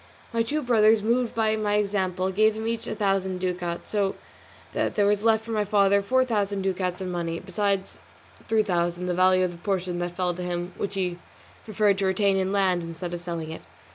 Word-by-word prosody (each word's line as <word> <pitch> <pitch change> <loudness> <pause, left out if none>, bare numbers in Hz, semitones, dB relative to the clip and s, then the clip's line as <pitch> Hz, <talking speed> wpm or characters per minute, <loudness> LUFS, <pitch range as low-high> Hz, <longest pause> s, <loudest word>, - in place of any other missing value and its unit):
My 230 - +2
two 295 +6 -1
brothers, 220 -3 +4
moved 235 +1 +1
by 220 -1 +2
my 210 -1 0
example, 190 -2 0
gave 215 +3 +3
him 220 0 -4
each 230 0 -2
a - - -3
thousand 195 -2 0
ducats, 180 -2 -3
so 200 -2 +1 0.6
that - - -1
there 205 - +3
was 205 0 +2
left 220 -1 +3
for 230 - -6
my 215 -1 +1
father 200 -1 +3
four 260 +5 +2
thousand 205 -4 -1
ducats 185 -1 -1
in 185 -1 -3
money, 170 -1 -2
besides 200 -2 -2 0.5
three 220 -1 +3
thousand, 175 -2 -1
the 180 - 0
value 185 +1 +4
of 180 - -2
the 175 - -11
portion 180 -1 -2
that 175 0 -3
fell 180 -1 0
to 180 - -7
him 175 0 -3
which 200 0 -4
he 180 -2 -2 0.5
preferred 205 -2 +2
to 195 - +1
retain 195 +1 +2
in 190 0 0
land 190 -3 +2
instead 165 +1 -6
of 175 - -4
selling 170 -2 -4
it. 160 - -7
195 Hz, 210 wpm, -25 LUFS, 180-215 Hz, 0.6 s, brothers